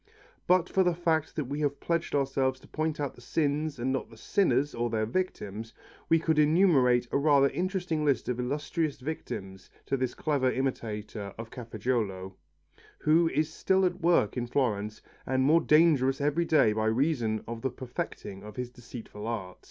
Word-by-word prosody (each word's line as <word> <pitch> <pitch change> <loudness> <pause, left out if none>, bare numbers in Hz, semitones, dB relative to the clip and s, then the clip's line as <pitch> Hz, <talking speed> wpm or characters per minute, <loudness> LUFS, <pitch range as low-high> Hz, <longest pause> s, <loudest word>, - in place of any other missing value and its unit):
But 180 -1 +4
for 190 - +2
the 180 -2 +2
fact 160 -3 0
that 150 - -2
we 140 +4 -4
have 145 -2 -1
pledged 170 -2 -1
ourselves 135 -1 +1
to - - -16
point 155 -1 -2
out 145 -2 -2
the - - -16
sins 150 +2 -1
and 130 +2 -1
not 135 - -3
the 115 - -15
sinners 145 - +1
or 120 0 -1
their 110 -1 0
victims, 110 - -4 0.3
we 165 - +6
could 160 -1 +1
enumerate 150 -7 +4
a - - +2
rather 140 -2 +4
interesting 180 -3 -2
list 140 -3 +1
of 125 -1 -2
illustrious 145 +4 -2
victims 95 -10 -6 0.2
to 135 - 0
this 130 -1 -2
clever 140 -4 +1
imitator 110 -6 -4
of 115 0 -8
Cafaggiolo, 110 -5 -3 0.6
who 165 +2 +3
is 155 +1 -1
still 190 +2 +2
at 180 +1 -1
work 170 -11 +3
in 120 -1 -2
Florence 110 -5 -1 0.2
and 130 0 +1
more 160 +5 +5
dangerous 150 -4 +4
every 150 +4 +1
day 150 -10 +4
by 110 0 0
reason 115 -3 +1
of 115 0 -5
the 130 - 0
perfecting 120 -5 -6
of 105 0 -10
his 125 -1 -4
deceitful 115 -3 -9
art. 95 -6 -4
135 Hz, 175 wpm, -29 LUFS, 115-155 Hz, 0.6 s, we